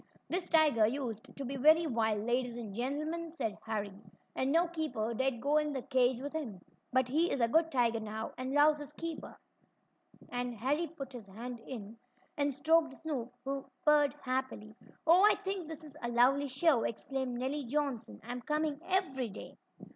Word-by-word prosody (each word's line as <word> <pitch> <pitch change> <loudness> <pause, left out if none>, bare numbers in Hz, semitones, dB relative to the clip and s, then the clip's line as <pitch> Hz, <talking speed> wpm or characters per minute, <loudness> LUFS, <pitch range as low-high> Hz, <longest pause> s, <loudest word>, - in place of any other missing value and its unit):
"This 360 0 -2
tiger 295 -9 +5
used 230 -3 -3
to 275 - -4
be 275 +2 -4
very 310 +5 +6
wild, 220 -6 0
ladies 240 0 0
and 220 -4 -6
gentlemen," 305 +8 -2
said 225 -10 -3
Harry, 210 -3 -2 0.4
"and 260 +1 +1
no 335 +3 +4
keeper 310 -10 -2
dared 260 0 0
go 285 +5 +2
in 300 -1 +1
the 265 -3 -3
cage 255 -2 +2
with 285 +3 -5
him. 255 -12 -4 0.3
But 260 0 +3
he 315 +7 +2
is - - -1
a 235 - +4
good 325 +6 +3
tiger 235 -3 +2
now, 220 0 -5
and 255 +1 -4
loves 295 +1 +5
his 290 0 -7
keeper," 330 +1 -6 0.9
and 245 -1 -3
Harry 285 +9 0
put 275 -4 -8
his 230 -5 -9
hand 235 +5 -7
in, 225 -2 -8 0.4
and 285 0 +1
stroked 310 +1 +2
Snoop, 265 -7 -4
who 275 0 -2 0.2
purred 295 -2 +5
happily. 255 -5 -3 0.3
"Oh, 345 +4 +7
I 420 - +7
think 385 -4 -4
this 320 0 -8
is 300 -3 -12
a 240 - -2
lovely 260 +4 +4
show!" 270 -1 +3
exclaimed 255 +2 -3
Nellie 270 +3 -2
Johnson. 250 - -2
"I'm 245 0 -5
coming 300 +1 -1
every 305 -11 0
day." 200 - -9
265 Hz, 180 wpm, -33 LUFS, 235-305 Hz, 0.9 s, Oh